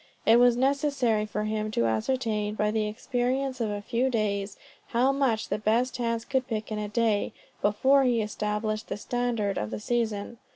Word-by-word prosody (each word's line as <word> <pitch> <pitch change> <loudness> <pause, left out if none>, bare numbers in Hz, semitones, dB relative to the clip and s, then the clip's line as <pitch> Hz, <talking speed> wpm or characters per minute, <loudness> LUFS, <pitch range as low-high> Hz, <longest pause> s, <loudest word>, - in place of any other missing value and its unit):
It 230 +2 +6
was 245 -1 +5
necessary 265 -5 +1
for 210 0 -3
him 215 0 -2
to 115 - +2
ascertain, 210 - 0
by 210 0 +1
the 215 -1 0
experience 255 +3 -1
of 220 - 0
a 205 0 -4
few 250 +4 0
days, 205 -4 -1 0.3
how 245 +3 +2
much 265 -5 0
the - - -1
best 235 +5 +1
hands 230 -1 -1
could 260 -2 0
pick 220 -3 -4
in 215 - -2
a 210 -1 -3
day, 220 -2 +1 0.3
before 265 +7 +4
he 245 -3 +2
established 215 +1 -2
the - - -4
standard 230 -3 -1
of 105 - -3
the 110 -1 -4
season. 225 - -2
225 Hz, 180 wpm, -27 LUFS, 210-245 Hz, 0.3 s, It